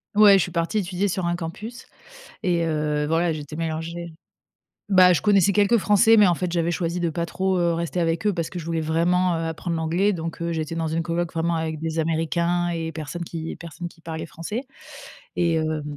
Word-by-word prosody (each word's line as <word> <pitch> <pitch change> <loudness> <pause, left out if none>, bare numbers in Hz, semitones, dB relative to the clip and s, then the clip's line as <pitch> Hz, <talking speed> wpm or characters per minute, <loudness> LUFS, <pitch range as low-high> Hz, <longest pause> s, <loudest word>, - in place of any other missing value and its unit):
Ouais, 210 -1 +8
je 190 - +2
suis - - -5
partie 170 +5 0
étudier 190 +1 -1
sur 185 -1 -2
un 175 - 0
campus 200 +8 -7 0.6
et 170 -2 +1
heu, 150 -2 0
voilà, 165 +2 +1
j'étais 150 0 -7
mélangée 165 +1 -4 0.8
bah, 185 -2 +7
je - - 0
connaissais 200 -2 +4
quelques 205 +3 +4
Français, 210 +3 +5
mais 210 - +7
en 175 - +4
fait 180 +1 -3
j'avais 170 -1 +1
choisi 170 0 -2
de 170 - +1
pas 170 +1 -2
trop 190 +2 -1
heu, 170 -1 +2
rester 170 +1 -2
avec 165 +3 0
eux 210 - +3
parce 165 -2 -3
que 180 - -6
je 165 - -6
voulais 165 -1 -1
vraiment, 175 +3 +2
heu, 165 - -2
apprendre 165 +1 -3
l'anglais. 170 +6 +1
Donc 165 -1 -5
heu, 170 - -1
j'étais 160 0 -3
dans 165 -1 -1
une 165 +1 -1
coloc 170 0 -2
vraiment 170 +1 0
avec 160 -1 -3
des 160 0 -3
américains 170 +2 0
et 165 -1 -3
personne 160 +2 -5
qui 160 -1 -6
personne 170 +1 -7
qui 165 - -22
parlait 160 -1 -5
français 170 +10 -5 0.7
et 170 -2 +2
heu 155 -1 -2
170 Hz, 215 wpm, -24 LUFS, 160-180 Hz, 0.8 s, Ouais